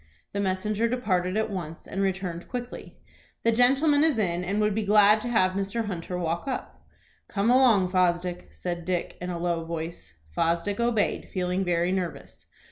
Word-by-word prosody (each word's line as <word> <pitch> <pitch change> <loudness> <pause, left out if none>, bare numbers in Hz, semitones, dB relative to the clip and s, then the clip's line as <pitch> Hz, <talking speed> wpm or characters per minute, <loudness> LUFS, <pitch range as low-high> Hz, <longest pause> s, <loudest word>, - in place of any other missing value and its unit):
The 200 - -2
messenger 205 +3 0
departed 195 -6 0
at 220 0 0
once, 165 -4 -6
and 195 - -3
returned 185 -3 -2
quickly. 245 0 -7 0.5
"The 230 - +4
gentleman 275 +6 +4
is 315 -6 +2
in, 180 -4 0
and 195 +4 -1
would 210 -1 +2
be 220 +1 -1
glad 210 +1 +5
to 245 - -4
have 185 -6 +3
Mr. 195 +4 -2
Hunter 180 -2 -4
walk 170 +4 -2
up." 260 - -5 0.4
"Come 210 +3 +1
along, 235 -8 +5
Fosdick," 180 -1 0
said 175 -1 -5
Dick, 180 0 -2
in 180 - -4
a 175 - -3
low 170 -1 -1
voice. 165 - -6 0.2
Fosdick 170 +5 0
obeyed, 235 -3 0
feeling 185 0 -1
very 175 0 +1
nervous. 185 -3 -4
190 Hz, 170 wpm, -26 LUFS, 175-220 Hz, 0.5 s, glad